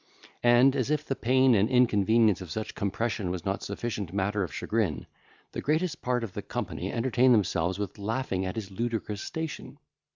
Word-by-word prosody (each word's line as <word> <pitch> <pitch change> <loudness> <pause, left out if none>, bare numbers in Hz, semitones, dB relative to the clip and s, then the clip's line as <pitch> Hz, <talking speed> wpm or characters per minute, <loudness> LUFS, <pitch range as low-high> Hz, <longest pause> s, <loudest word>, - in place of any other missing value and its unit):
And, 120 +3 +5
as 130 -2 0
if 150 0 0
the 135 - -2
pain 130 +1 +4
and 105 +1 +3
inconvenience 110 -4 +3
of 90 - -8
such 110 +7 -4
compression 105 -1 -2
was 90 -1 -4
not 95 0 -1
sufficient 100 -3 -4
matter 100 +2 0
of 90 - -2
chagrin, 95 - -1 0.5
the - - -4
greatest 160 +3 0
part 125 -1 0
of 105 -5 -6
the - - -4
company - - -4
entertained 125 +1 +3
themselves 90 -3 0
with 105 0 -5
laughing 105 -2 -2
at 95 0 -3
his 105 -3 -5
ludicrous 110 -1 -3
station. 160 -3 -5
110 Hz, 175 wpm, -28 LUFS, 100-125 Hz, 0.5 s, And